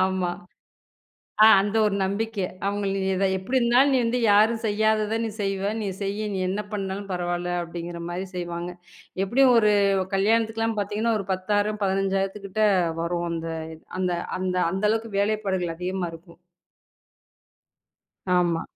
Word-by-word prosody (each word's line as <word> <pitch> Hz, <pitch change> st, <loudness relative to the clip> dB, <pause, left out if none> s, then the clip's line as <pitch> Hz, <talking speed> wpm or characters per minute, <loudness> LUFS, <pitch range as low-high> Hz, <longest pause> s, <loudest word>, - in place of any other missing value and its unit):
ஆமா. 185 Hz, -1 st, +1 dB, 1.1 s
அ, -, -, +10 dB, 0.2 s
அந்த 205 Hz, +2 st, -1 dB
ஒரு 205 Hz, -, 0 dB
நம்பிக்கை 205 Hz, +1 st, -2 dB, 0.2 s
அவங்களு 200 Hz, -1 st, -1 dB
"நீ 190 Hz, -, 0 dB, 0.3 s
எப்படி 250 Hz, +8 st, 0 dB
இருந்தாலும், 250 Hz, +4 st, +4 dB
நீ 260 Hz, -, +4 dB
வந்து 240 Hz, +2 st, 0 dB
யாரும் 220 Hz, +2 st, +4 dB
செய்யாதத 215 Hz, +1 st, +1 dB
நீ 225 Hz, -, -2 dB
செய்வ, 195 Hz, -1 st, -2 dB, 0.2 s
நீ -, -, -2 dB, 0.2 s
செய்யு 200 Hz, +2 st, -2 dB
நீ 190 Hz, -, -2 dB
என்ன 205 Hz, +2 st, -2 dB
பண்ணாலும் 200 Hz, 0 st, -4 dB
பரவால்ல." 175 Hz, 0 st, -2 dB
அப்படிங்கற 170 Hz, 0 st, -6 dB
மாரி 180 Hz, +2 st, -4 dB
செய்வாங்க. 175 Hz, 0 st, -4 dB, 0.5 s
எப்டி 240 Hz, +8 st, +3 dB
ஒரு 210 Hz, -2 st, +5 dB, 0.4 s
கல்யாணத்துக்குலாம் 225 Hz, +2 st, +1 dB
பாத்தீங்கன்னா 215 Hz, +3 st, 0 dB
ஒரு 195 Hz, -, -7 dB
10,000 205 Hz, +3 st, 0 dB
15,000 195 Hz, +1 st, 0 dB, 0.4 s
வரும். 170 Hz, 0 st, -2 dB
அந்த 165 Hz, 0 st, -4 dB, 0.5 s
அந்த 180 Hz, -1 st, 0 dB, 0.3 s
அந்த 185 Hz, 0 st, -2 dB
அந்த 190 Hz, +3 st, -2 dB
அளவுக்கு 225 Hz, +1 st, -1 dB
வேலைப்பாடுகள் 200 Hz, -4 st, 0 dB
அதிகமா 180 Hz, +1 st, -3 dB
இருக்கும். 170 Hz, +1 st, -15 dB, 2.0 s
ஆமா. 170 Hz, -2 st, +1 dB
195 Hz, 130 wpm, -25 LUFS, 180-215 Hz, 2.0 s, அ